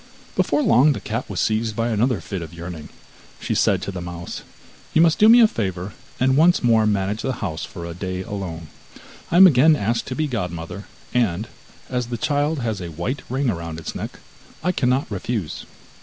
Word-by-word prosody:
Before 295 - +2
long 150 - +5
the - - -5
cat 115 +3 -4
was - - -3
seized 110 0 0
by 115 +1 0
another 115 +1 +1
fit 95 -3 -5
of 85 0 -8
yearning. 85 -2 -8 0.5
She - - -2
said - - +2
to - - -3
the 90 -2 -6
mouse: 85 -1 -6 0.5
'You 160 - +6
must 165 -2 +3
do 215 - +7
me 240 +1 +8
a 225 - +8
favour, 95 - -3 0.3
and 130 +1 +3
once 170 +3 +4
more 115 -2 +4
manage 105 +1 0
the 130 - -1
house 80 -4 -4
for 85 -5 -8
a 85 - -6
day 95 +1 -4
alone. 90 -6 -6 0.6
I 170 - +2
am 190 - +10
again 155 -1 +6
asked 115 -2 -1
to 130 - -4
be 155 - 0
godmother, 90 - -4 0.3
and, 110 -4 +1 0.4
as 125 -2 -2
the 120 0 -4
child 145 +4 0
has 110 -5 -2
a 85 - -5
white 85 - -3
ring 130 +1 0
round 85 -3 -5
its 80 - -6
neck, - - -6 0.5
I 180 - +2
cannot 130 -4 +1
refuse. 100 -3 -4
110 Hz, 200 wpm, -22 LUFS, 90-130 Hz, 0.6 s, am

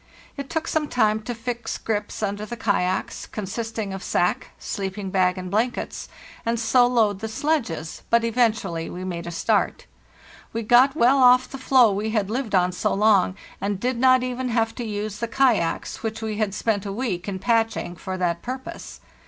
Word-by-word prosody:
It 280 -1 -6
took 325 0 -2
some 310 -1 0
time 220 -4 +2
to 240 +2 -5
fix 235 0 -4
grips 210 0 -3
under 205 0 -2
the 235 +3 -6
kayaks, 190 -4 -1
consisting 215 0 -4
of 195 - -6
sack, 175 - 0
sleep 195 0 -4
ing 195 -2 -4
bag, 185 -1 +2
and 185 -1 -6
blankets, 230 +5 -2 0.3
and 230 0 0
so 245 +2 +4
load 220 -5 +2
the 220 - -4
sledges; 225 - -2
but 235 0 +4
eventually 220 -8 0
we 180 - -6
made 170 -2 -5
a - - -4
start. 165 - 0 0.7
We 230 0 -2
got 250 +5 +5
well 270 -1 +4
off 250 0 +6
the 270 - -8
floe 255 -4 +5
we 205 +3 -2
had 210 -2 0
lived 235 -4 -1
on 180 0 +3
so 180 - -1
long, 200 -3 +4 0.3
and 200 -1 -1
did 245 +2 -1
not 255 0 +5
even 255 0 -2
have 225 -1 +1
to 245 - -5
use 210 -1 -4
the 235 - -2
kayaks 230 -10 +1
which 220 -1 -3
we 215 -1 -3
had 210 -2 -1
spent 210 -2 0
a - - -3
week 195 -5 -3
in 195 -2 -3
patching 225 -4 0
for 185 +1 -5
that 170 -2 -1
purpose. 260 +2 -7
220 Hz, 190 wpm, -24 LUFS, 195-245 Hz, 0.7 s, off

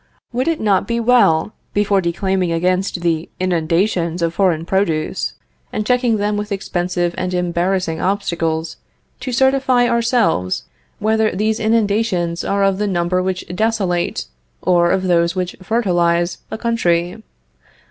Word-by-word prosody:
Would 255 +4 -1
it 330 -1 +1
not 200 -3 +1
be 235 0 0
well, 225 -7 +3 0.2
before 205 -1 +2
declaiming 185 +1 0
against 180 +2 0
the 165 -1 -1
inundations 170 0 0
of 165 0 0
foreign 170 -4 +1
produce, 165 -4 -1 0.4
and 215 - -2
checking 245 -1 +2
them 205 0 0
with 210 0 -4
expensive 175 -2 -1
and 185 0 -2
embarrassing 180 -1 -1
obstacles, 165 -4 -1 0.4
to 255 - -4
certify 265 -1 +3
ourselves 230 - +1 0.3
whether 220 +1 +2
these 215 +4 -1
inundations 205 -6 +1
are 200 0 0
of 195 0 +2
the 210 - 0
number 180 -1 0
which 185 0 -2
desolate, 195 -4 0 0.4
or 175 -1 +3
of 190 +1 +1
those 170 -1 +2
which 180 -1 -2
fertilize 175 -5 +1
a - - -4
country? 180 -5 0
185 Hz, 135 wpm, -18 LUFS, 175-215 Hz, 0.4 s, well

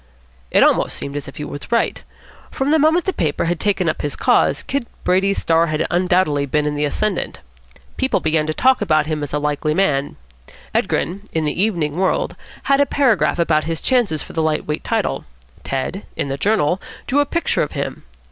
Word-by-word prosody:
It - - +5
almost - - +2
seemed 140 - -6
as 145 - -4
if 135 - -10
he 150 - -4
were 145 - -6
right. 235 -1 +1 0.5
From 270 +2 -1
the 315 - +4
moment 320 +4 +3
the 380 - 0
paper 155 - -1
had 170 -1 -1
taken 195 -4 +1
up 155 - -1
his 145 - -2
cause, - - +2
Kid 275 -4 -2 0.2
Brady's 190 +2 +2
star 165 +1 +2
had 155 -1 0
undoubtedly 175 -5 +2
been 150 +2 +1
in 150 - 0
the 150 0 0
ascendant. 210 +8 -2 0.6
People 260 0 +1
began 155 -1 +1
to 155 - 0
talk 260 0 +3
about 155 -2 +2
him 155 -1 -2
as 145 - -4
a 150 - 0
likely 150 +1 -1
man. 145 -7 +1 0.6
Edgren, 200 +4 -1
in 160 -1 0
the 150 +4 -1
Evening 170 -8 0
World, 190 0 0 0.3
had 275 0 +3
a 285 - +3
paragraph 255 -12 +2
about 160 -3 +2
his 165 0 -2
chances 235 - +1
for - - -12
the 160 - 0
light 155 -1 0
weight 150 0 -3
title. - - -1 0.4
Tad, 135 +9 -3
in 140 - -2
the 135 - -1
Journal, 185 0 +1 0.2
drew 280 - +1
a 290 - +4
picture 335 +3 0
of 150 - -2
him. - - -4
165 Hz, 205 wpm, -20 LUFS, 150-210 Hz, 0.6 s, It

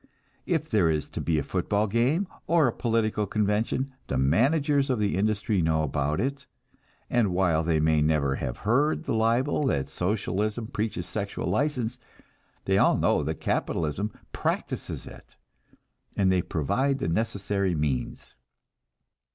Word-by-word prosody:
If 160 -3 0
there 100 - +3
is 75 -1 -1
to - - -5
be 80 -2 +1
a 75 - 0
football 100 +6 0
game, 120 - +1 0.2
or 165 -2 +4
a 120 - 0
political 110 -3 0
convention, 110 +6 0
the 65 - -1
managers 140 - +2
of 130 - +1
the 105 -3 0
industry 105 0 +1
know 80 -1 +2
about 75 +2 -1
it, 140 +4 -2 0.6
and 115 -6 +2
while 90 -3 +2
they 80 -1 +1
may 80 0 +3
never 75 -3 +1
have 60 - -4
heard 140 +8 +2
the - - -2
libel 120 +6 +2
that 70 - 0
Socialism 105 +3 -1
preaches 105 -5 -3
sexual 100 +3 -4
license, 125 -4 -1 0.7
they - - +3
all - - +4
know - - +2
that - - -4
capitalism 85 +7 -1 0.2
practices - - -3
it, - - -13 0.8
and 95 -2 +3
they 90 -1 +3
provide 120 - 0
the 105 - -2
necessary 100 -1 0
means. 75 -4 -3
105 Hz, 145 wpm, -27 LUFS, 80-120 Hz, 0.8 s, or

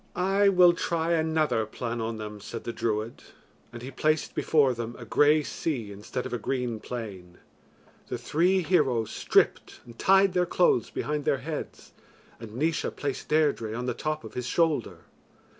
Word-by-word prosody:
"I 195 +2 +3
will 180 -2 +6
try 170 -1 -1
another 160 -7 +1
plan 120 +1 -4
on 115 0 -3
them," 105 -1 -7
said 115 +3 -7
the 120 - -4
druid; 110 0 -2 0.5
and 120 0 -9
he 130 - -6
placed 155 +3 0
before 145 -5 +3
them 120 0 -5
a 120 - -9
grey 150 +6 +4
sea 125 -9 -3
instead 105 +5 -5
of 130 - -5
a 120 - -1
green 125 -1 -2
plain. 100 -7 -7 0.7
The - - -3
three 180 +4 +1
heroes 135 - +1
stripped - - +1
and 120 -1 -14
tied 195 0 +4
their 180 -1 +2
clothes 175 -10 +2
behind 150 0 -3
their 140 - +2
heads, 155 -2 -6 0.5
and 110 -1 -10
Naois 155 +5 0
placed 140 -2 -4
Deirdre 145 -8 +1
on 120 +1 -3
the 125 - -1
top 155 +5 -3
of - - -10
his 125 -1 -4
shoulder. 155 -4 0
130 Hz, 170 wpm, -27 LUFS, 115-160 Hz, 0.7 s, will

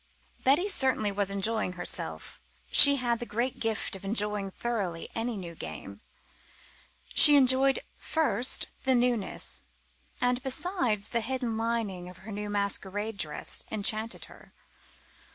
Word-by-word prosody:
Betty 290 +9 +2
certainly 260 - 0
was 200 -1 -2
enjoying 200 0 -1
herself. 180 - -4 0.3
She 280 0 +11
had 240 -3 -2
the 240 - -6
great 240 +4 -4
gift 225 -3 -3
of 195 - -12
enjoying 210 -1 -2
thoroughly 195 -6 -5
any 230 0 -4
new 175 -3 -9
game. 100 - -10 1.1
She 295 -1 +10
enjoyed, 265 0 +3 0.2
first, 300 -6 -1 0.2
the 260 -1 +2
newness; 240 -4 -2 0.6
and, 245 0 -1
besides, 260 - -2
the 235 - -2
hidden 245 -1 -4
lining 220 -6 -4
of 180 - -14
her 220 - -9
new 210 0 -6
masquerade 205 +1 -2
dress 150 -5 -1
enchanted 220 +2 -2
her. - - -19
225 Hz, 130 wpm, -27 LUFS, 200-250 Hz, 1.1 s, She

